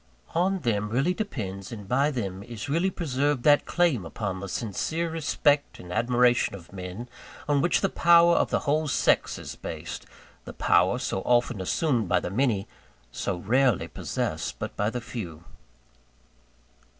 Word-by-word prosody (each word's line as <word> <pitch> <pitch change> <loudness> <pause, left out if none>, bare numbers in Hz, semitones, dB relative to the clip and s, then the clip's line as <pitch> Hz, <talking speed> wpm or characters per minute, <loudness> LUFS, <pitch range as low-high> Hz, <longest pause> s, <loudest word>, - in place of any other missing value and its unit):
On 185 +2 +1
them 105 -3 0
really 135 +10 +1
depends, 100 - -5
and 105 -4 -8
by 135 +6 +2
then 100 -9 -4
is 115 +3 -7
really 165 +6 +1
preserved, 145 -6 -1
that 145 -1 +5
claim 170 - +2
upon 95 +2 -4
the 100 +1 -6
sincere 155 - -2
respect 150 -2 +1
and 90 0 -8
admiration 120 0 +2
of 90 0 -13
men, 95 +5 -6 0.4
on 145 -1 +3
which 175 - +2
the 195 - +3
power 170 -1 +5
of - - +2
the - - 0
whole 155 +1 +1
sex - - +2
is - - -7
based - - -7 0.4
the - - -9
power 90 +7 +3
so 95 -6 -2
often 120 -3 +1
assumed 115 - 0
by - - +3
the - - -5
many, 110 -3 +1 0.4
so 90 - -2
rarely 120 +4 +2
possessed - - -3
but - - -5
by 105 +1 0
the 120 +1 -4
few. 95 -10 -7
125 Hz, 160 wpm, -26 LUFS, 100-150 Hz, 0.4 s, that